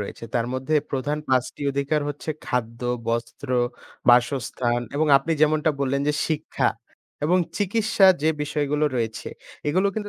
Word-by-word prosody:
রয়েছে। 105 +3 -6
তার 120 -1 +1
মধ্যে 130 +4 -1 0.2
প্রধান 145 +3 -1
৫ 130 +2 0
অধিকার 140 +2 0
হচ্ছে 145 +2 -5 0.2
খাদ্য, 115 -2 -2 0.3
বস্ত্র, 115 +1 -3 0.6
বাসস্থান 120 -1 +3 0.2
এবং 155 +1 +2
আপনি 160 +4 -2
যেমনটা 155 0 +3
বললেন 140 0 +1
যে 150 - +3
শিক্ষা 155 -1 0 0.6
এবং 175 +4 +3 0.2
চিকিৎসা 205 0 +3 0.2
যে 155 - +3
বিষয়গুলো 150 0 0
রয়েছে। 115 -2 -3 0.4
এগুলো 185 +6 +2
কিন্তু 210 -1 -4
145 Hz, 135 wpm, -24 LUFS, 125-155 Hz, 0.6 s, বাসস্থান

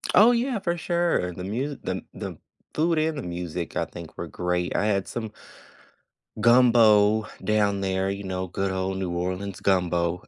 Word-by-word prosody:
Oh, 220 +6 +8
yeah, 240 -1 0
for 175 -2 -1
sure, 170 - 0
the 90 - -7
musi 130 +8 -3
the - - -3
the - - -6 0.4
food 165 +1 +1
and 155 -1 0
the - - -3
music, 85 -1 -5
I - - +1
think, - - -11
were - - -4
great, 90 0 -2
I 105 - +1
had 100 -3 0
some 110 -2 -5 1.1
gumbo 110 -3 +5 0.2
down 105 -2 +1
there, 95 0 0
you 100 +1 -4
know, 95 0 -3
good 95 +2 -2
old 95 0 -2
New 95 -2 -2
Orleans 90 +3 -3
gumbo. 90 -2 +1
100 Hz, 170 wpm, -25 LUFS, 90-125 Hz, 1.1 s, Oh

